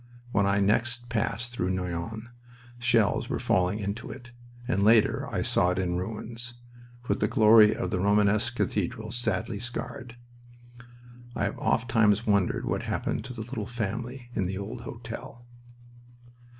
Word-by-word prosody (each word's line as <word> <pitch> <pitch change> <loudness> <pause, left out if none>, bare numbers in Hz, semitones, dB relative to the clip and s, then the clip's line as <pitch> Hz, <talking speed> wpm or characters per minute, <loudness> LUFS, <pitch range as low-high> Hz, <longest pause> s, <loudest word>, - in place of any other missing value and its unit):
When 100 -3 +2
I 100 0 +2
next 120 +4 +1
passed 120 +1 -1
through 95 -7 -2
Noyon 95 +5 -3 0.5
shells 115 -4 +2
were - - -1
falling 90 +2 +1
into 105 +2 -4
it, 120 -2 -10 0.4
and 100 -6 +1
later 110 +1 +4
I - - -1
saw 90 - +3
it 90 - -1
in 90 -2 0
ruins, 115 +5 -6 0.5
with - - 0
the - - +2
glory 110 0 +6
of - - -3
the 90 - 0
Romanesque 105 +4 +2
cathedral 110 +1 -2
sadly 110 -2 -2
scarred. 125 0 -5 1.2
I - - -1
have - - -2
ofttimes 115 -2 +2
wondered 100 -3 +1
what - - -1
happened - - -2
to 125 - -6
the 115 - -6
little 110 -2 -5
family 120 +2 -4
in 95 -6 0
the 95 +1 -3
old 110 +5 -6
hotel. 115 +1 -8
110 Hz, 150 wpm, -28 LUFS, 100-120 Hz, 1.2 s, glory